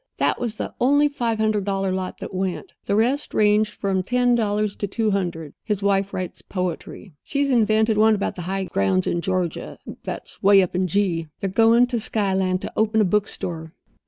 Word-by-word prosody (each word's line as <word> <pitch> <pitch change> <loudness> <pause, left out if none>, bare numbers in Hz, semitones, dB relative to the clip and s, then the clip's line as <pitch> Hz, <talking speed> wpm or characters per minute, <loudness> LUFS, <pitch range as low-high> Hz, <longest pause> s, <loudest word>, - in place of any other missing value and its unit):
That - - +1
was 235 -3 -2
the - - -5
only 285 +4 +4
five 235 -6 -2
hundred 215 -2 +1
dollar 195 -1 -1
lot 185 0 -3
that - - -7
went. 190 - -3
The 200 - 0
rest 250 +7 0
ranged 210 0 +3
from 195 -2 -1
ten 245 +4 +2
dollars 210 -2 0
to 205 - -2
two 215 +2 0
hundred. 170 -6 -3
His 210 -3 -2
wife 200 0 +1
writes 185 -1 -5
poetry. 180 0 -5
She's 280 -1 -1
invented 220 -2 +3
one 220 0 +5
about 200 - -2
the 180 - -6
high 195 0 -1
grounds 95 - 0
of 170 - -1
Georgia, 185 -2 -2 0.3
that's - - -6
way 195 -1 +6
up 180 - -4
in 185 +1 +1
G. 175 -3 0
They're 195 - -2
going 230 +4 +5
to 245 -1 -2
Skyland 190 -4 0
to - - -5
open 220 0 +2
a 215 - +4
book 210 +3 +1
store." 160 -2 -6
200 Hz, 195 wpm, -23 LUFS, 185-220 Hz, 0.3 s, way